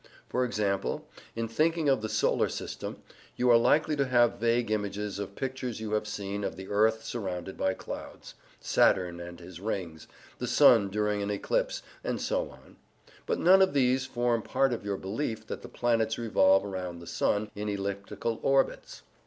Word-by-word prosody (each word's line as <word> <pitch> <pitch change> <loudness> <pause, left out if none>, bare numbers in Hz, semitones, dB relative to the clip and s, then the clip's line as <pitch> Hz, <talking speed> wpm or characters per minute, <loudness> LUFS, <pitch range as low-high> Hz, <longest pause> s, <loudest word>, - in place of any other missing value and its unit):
For 125 - +1
example, 100 -5 -1 0.3
in 115 0 -2
thinking 155 +6 +1
of 135 -5 +3
the 110 - -3
Solar - - +2
System, - - -6 0.3
you 125 0 +3
are - - +8
likely 150 +6 +3
to 140 -1 +1
have 120 -3 +3
vague 115 0 +1
images 105 -1 -2
of 100 0 -6
pictures 130 -3 -4
you 110 -1 -5
have 105 0 0
seen 100 -1 -4
of 90 - -3
the 95 +1 -9
earth 110 +2 +2
surrounded 95 -5 -4
by 95 - 0
clouds, - - -8 0.3
Saturn 90 -2 +2
and 85 0 -8
his 90 0 -10
rings, 90 -6 -4 0.3
the - - -3
sun 100 - +6
during 105 0 0
an 100 - -2
eclipse, - - -1 0.2
and - - -2
so - - -1
on; - - -17 0.5
but - - +1
none 190 +2 +6
of 190 -6 +3
these 130 -1 +2
form 120 -2 0
part 135 +3 +1
of 115 - -4
your 100 -1 -2
belief 110 +3 -3
that - - -6
the 120 - -10
planets 115 -2 +1
revolve 95 -4 +4
round 90 -3 -5
the 85 - -11
sun 105 +4 0
in 105 +1 -4
elliptical 100 +3 -3
orbits. 135 0 0
110 Hz, 180 wpm, -29 LUFS, 100-120 Hz, 0.5 s, are